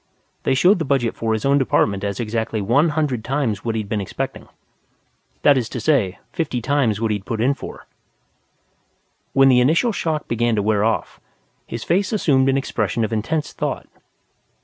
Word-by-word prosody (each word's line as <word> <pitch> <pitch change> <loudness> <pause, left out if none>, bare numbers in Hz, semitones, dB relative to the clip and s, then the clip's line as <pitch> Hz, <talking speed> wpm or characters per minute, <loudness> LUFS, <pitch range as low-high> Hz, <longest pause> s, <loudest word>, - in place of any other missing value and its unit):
They - - +1
showed 180 +8 +4
the - - 0
budget 130 -5 0
for 115 -1 -2
his 110 +2 -1
own 140 +1 +4
department 100 -6 +1
as 100 -1 -3
exactly 110 -1 -2
one 125 +11 +3
hundred 150 -7 -1
times 130 -7 -1
what 115 -1 -2
he'd 110 -2 -3
been 105 0 -2
expecting. 95 - -5 1.0
That 145 -2 +5
is 120 - -4
to 125 - -5
say, 110 -7 +1 0.2
fifty 145 -7 -2
times 120 -4 +1
what 110 -1 0
he'd 105 -2 -2
put 110 +2 -4
in 130 +5 +3
for. - - -9 1.5
When 135 0 +5
the 125 -2 +5
initial 165 - +3
shock 160 -6 -2
began 120 0 +1
to 105 - 0
wear 105 -1 +2
off, 110 0 -1 0.5
his 115 -1 -5
face 185 +3 +1
assumed 135 -11 +2
an 135 - +2
expression 115 -4 -1
of 110 - -5
intense 145 +8 -2
thought. - - -3
120 Hz, 180 wpm, -21 LUFS, 110-140 Hz, 1.5 s, That